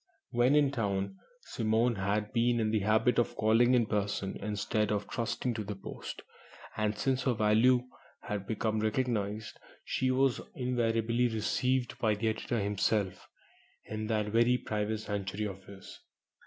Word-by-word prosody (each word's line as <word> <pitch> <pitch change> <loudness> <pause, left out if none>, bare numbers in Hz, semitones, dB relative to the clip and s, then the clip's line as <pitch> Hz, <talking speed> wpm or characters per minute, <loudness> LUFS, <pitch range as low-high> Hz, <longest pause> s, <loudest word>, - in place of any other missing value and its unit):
When 120 +4 +3
in 145 -2 +4
town, 105 - -2 0.2
Simone 115 - +1
had 105 +3 -1
been 120 0 +2
in 110 -1 +1
the 110 - +2
habit 110 +5 +3
of 120 - 0
calling 115 +3 +4
in 120 -2 +3
person 100 -2 -2
instead 105 +1 -1
of 105 -1 -1
trusting 120 +1 -2
to 110 -1 -3
the 105 0 -5
post, 95 - -8 0.5
and 110 -1 0
since 135 -1 +1
her 125 -3 +2
value 115 +4 +4 0.3
had 100 -2 -4
become 110 0 -1
recognized, 110 -2 -1 0.3
she 130 - 0
was 130 0 +2
invariably 120 -1 +1
received 120 +3 0
by 110 -2 +2
the 110 +2 0
editor 110 +1 -2
himself 100 -2 0 0.6
in 110 0 -4
that 105 -2 0
very 120 +3 +4
private 105 -1 -2
sanctuary 100 0 -3
of 95 -2 -7
his. 100 -1 -12
110 Hz, 150 wpm, -31 LUFS, 105-120 Hz, 0.6 s, in